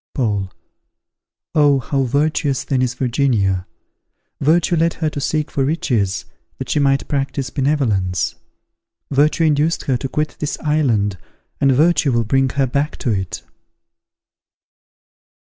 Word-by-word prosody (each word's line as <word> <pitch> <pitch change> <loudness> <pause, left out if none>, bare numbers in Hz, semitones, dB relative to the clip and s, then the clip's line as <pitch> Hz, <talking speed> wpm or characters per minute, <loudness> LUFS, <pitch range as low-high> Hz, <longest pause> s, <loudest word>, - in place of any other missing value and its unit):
Paul. 100 -7 -1 1.0
Oh! 145 -2 +4
how 135 +2 -1
virtuous, 140 +1 0
then, 130 -2 0
is 125 -1 0
Virginia! 115 -8 0 0.7
Virtue 165 +4 +2
led 165 +1 +1
her 155 -2 -1
to 145 - -4
seek 155 +1 -1
for 135 - 0
riches, 120 - 0 0.3
that - - -5
she - - +2
might 135 -1 +2
practise 135 -2 -2
benevolence. 120 - 0 0.8
Virtue 150 +4 +3
induced 155 +1 +2
her 130 -3 0
to 135 +2 -5
quit 150 +4 -2
this 150 - -2
island, 115 - +1 0.4
and 135 - +4
virtue 150 +1 +3
will 115 -1 +2
bring 135 +4 +2
her 135 +1 +1
back 140 +4 -1
to 120 - -1
it. 95 -3 -3
135 Hz, 130 wpm, -19 LUFS, 120-150 Hz, 1.0 s, Oh